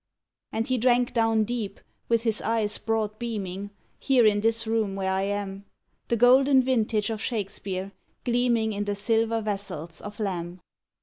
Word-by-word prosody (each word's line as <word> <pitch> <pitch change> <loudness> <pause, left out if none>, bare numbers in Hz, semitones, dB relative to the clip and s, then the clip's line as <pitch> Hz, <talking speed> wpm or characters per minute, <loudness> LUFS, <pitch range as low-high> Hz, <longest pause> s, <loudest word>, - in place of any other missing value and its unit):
And 225 +1 -1
he 255 0 0
drank 245 0 +3
down 225 -2 +3
deep, 215 -3 -4 0.3
with 230 -1 +2
his 225 -3 0
eyes 220 -2 0
broad 215 -1 -1
beaming, 205 -4 -4 0.3
Here 260 -4 +4
in 205 -1 +4
this 225 +1 +1
room 220 -3 0
where 190 -1 -1
I 190 0 +1
am, 200 0 -3 0.4
The 235 - +1
golden 260 +3 +6
vintage 225 -4 +1
of 220 -1 -4
Shakespeare, 195 -4 -3 0.3
gleaming 235 -3 +2
In 205 0 -2
the 205 0 -1
silver 225 +2 +1
vessels 195 -6 -5
of 205 +1 -9
Lamb. 180 -3 -3
220 Hz, 160 wpm, -26 LUFS, 200-230 Hz, 0.4 s, golden